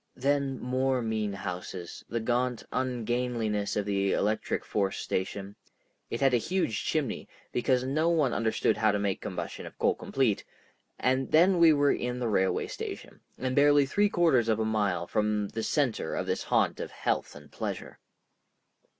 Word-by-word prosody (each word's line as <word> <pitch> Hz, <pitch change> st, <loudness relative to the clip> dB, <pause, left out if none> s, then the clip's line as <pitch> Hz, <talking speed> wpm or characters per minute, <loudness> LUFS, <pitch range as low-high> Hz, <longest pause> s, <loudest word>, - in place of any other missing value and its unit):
Then 140 Hz, 0 st, 0 dB
more 130 Hz, +1 st, 0 dB
mean 110 Hz, -2 st, -1 dB
houses, 90 Hz, -2 st, -6 dB
the 115 Hz, -, -1 dB
gaunt 125 Hz, +1 st, 0 dB
ungainliness 120 Hz, -4 st, -1 dB
of 105 Hz, -, 0 dB
the 100 Hz, -1 st, +1 dB
electric 105 Hz, +1 st, 0 dB
force 100 Hz, -2 st, -1 dB
station—it 100 Hz, +4 st, -6 dB
had 135 Hz, -2 st, +3 dB
a -, -, +6 dB
huge 120 Hz, -, -1 dB
chimney, 150 Hz, -7 st, -1 dB, 0.2 s
because 125 Hz, +1 st, +1 dB
no 155 Hz, +5 st, +1 dB
one 155 Hz, -7 st, +2 dB
understood 110 Hz, -2 st, +1 dB
how 110 Hz, 0 st, +3 dB
to 105 Hz, -, 0 dB
make 100 Hz, -2 st, -1 dB
combustion -, -, -5 dB
of -, -, -13 dB
coal -, -, +3 dB
complete—and 130 Hz, +1 st, -2 dB
then 175 Hz, +3 st, +5 dB
we 165 Hz, -1 st, +8 dB
were 145 Hz, -1 st, +4 dB
in 125 Hz, 0 st, -2 dB
the 120 Hz, -2 st, -1 dB
railway 95 Hz, -2 st, +1 dB
station, -, -, -7 dB, 0.2 s
and 130 Hz, 0 st, -2 dB
barely 145 Hz, 0 st, +5 dB
three 205 Hz, +9 st, +2 dB
quarters 145 Hz, -, +3 dB
of 110 Hz, -1 st, +2 dB
a 110 Hz, -, +1 dB
mile 100 Hz, -5 st, 0 dB
from 105 Hz, 0 st, 0 dB
the 115 Hz, -, -4 dB
center 130 Hz, +1 st, 0 dB
of -, -, -2 dB
this -, -, -1 dB
haunt -, -, +1 dB
of -, -, -4 dB
health -, -, -2 dB
and -, -, -13 dB
pleasure. -, -, -5 dB
120 Hz, 160 wpm, -29 LUFS, 105-135 Hz, 0.2 s, we